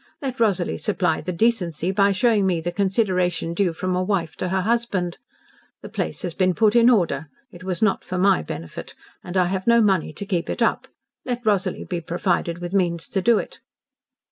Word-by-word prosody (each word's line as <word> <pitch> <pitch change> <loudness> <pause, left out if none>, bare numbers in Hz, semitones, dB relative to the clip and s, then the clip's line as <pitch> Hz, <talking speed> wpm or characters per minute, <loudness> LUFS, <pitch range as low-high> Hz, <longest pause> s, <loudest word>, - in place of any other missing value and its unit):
Let 265 -4 -5
Rosalie 195 -6 +1
supply 185 -7 0
the 180 - -4
decency 180 -4 0
by 200 0 +3
showing 205 0 +2
me 175 -3 +1
the 175 +2 -3
consideration 185 -4 0
due 180 0 +1
from 185 +3 -2
a 180 - +1
wife 185 -5 -1
to 185 - -2
her 190 +1 0
husband. 205 -5 -1 0.6
The - - -8
place - - -4
has 175 -3 -3
been 185 -1 +1
put 215 0 +3
in 235 0 +6
order. 165 - +1 0.2
It 175 +1 -12
was 185 +1 -2
not 205 -3 +2
for 185 - -4
my 190 +1 +3
benefit, 80 0 -7 0.3
and 180 +1 -4
I 180 - +4
have 185 +2 -3
no 235 0 +6
money 190 -8 +2
to 180 +6 -7
keep 180 -4 -2
it - - 0
up. - - 0 0.4
Let 245 -2 -4
Rosalie 195 -3 0
be 175 -2 -3
provided 170 0 -1
with 175 +1 -6
means 170 -4 0
to 195 - -1
do 230 +3 +4
it." - - -5
185 Hz, 200 wpm, -23 LUFS, 175-210 Hz, 0.6 s, in